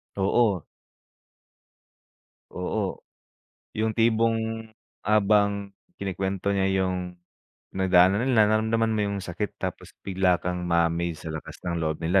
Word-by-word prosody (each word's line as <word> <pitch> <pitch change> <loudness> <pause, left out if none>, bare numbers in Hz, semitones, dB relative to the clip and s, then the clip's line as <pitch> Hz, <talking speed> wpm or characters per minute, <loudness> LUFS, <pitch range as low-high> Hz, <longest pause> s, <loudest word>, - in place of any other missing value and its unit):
Oo. 100 -2 +2 1.9
Oo. 95 +2 -3 0.8
Yung 110 0 +1
tipong 115 0 +1 0.4
habang 100 -1 +2 0.3
kinikuwento 95 0 -2
niya 95 0 +2 0.2
yung, 90 -1 -3 0.6
pinagdaanan 95 +1 +4
nila, - - +2 0.2
nararamdaman 110 +1 +2
mo 110 - 0
yung 100 0 -2
sakit, 95 +4 -4
tapos - - -6
bigla 95 -2 +2
kang 90 0 -3
ma-amaze 85 -1 0
sa 80 - -4
lakas 80 - -7
ng 85 -1 -2
loob 80 -1 -1
nila, 90 +4 +4
95 Hz, 115 wpm, -26 LUFS, 90-110 Hz, 1.9 s, pinagdaanan